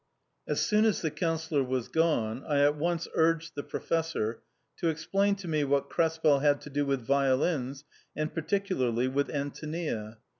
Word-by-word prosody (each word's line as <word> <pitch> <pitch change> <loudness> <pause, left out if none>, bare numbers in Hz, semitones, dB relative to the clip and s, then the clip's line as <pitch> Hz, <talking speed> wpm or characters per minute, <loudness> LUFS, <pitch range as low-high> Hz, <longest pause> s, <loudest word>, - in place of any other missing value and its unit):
As - - 0
soon 210 0 +3
as 215 -4 +1
the 160 - 0
Councillor 160 -4 0
was 130 -2 -2
gone, 135 -8 +1
I 145 -2 +2
at 145 +1 +4
once 170 +2 -1
urged 165 0 +2
the 145 - -4
Professor 160 -9 -2 0.4
to 170 - -1
explain 195 +6 +1
to 195 -3 -9
me 155 -2 +1
what 140 0 0
Krespel 160 -3 +3
had 145 0 +3
to 150 - -10
do 145 0 0
with 135 -2 0
violins, 135 +1 +1 0.3
and 155 0 -2
particularly 155 - 0
with 140 +2 0
Antonia. 145 -6 -4
150 Hz, 160 wpm, -29 LUFS, 135-165 Hz, 0.4 s, at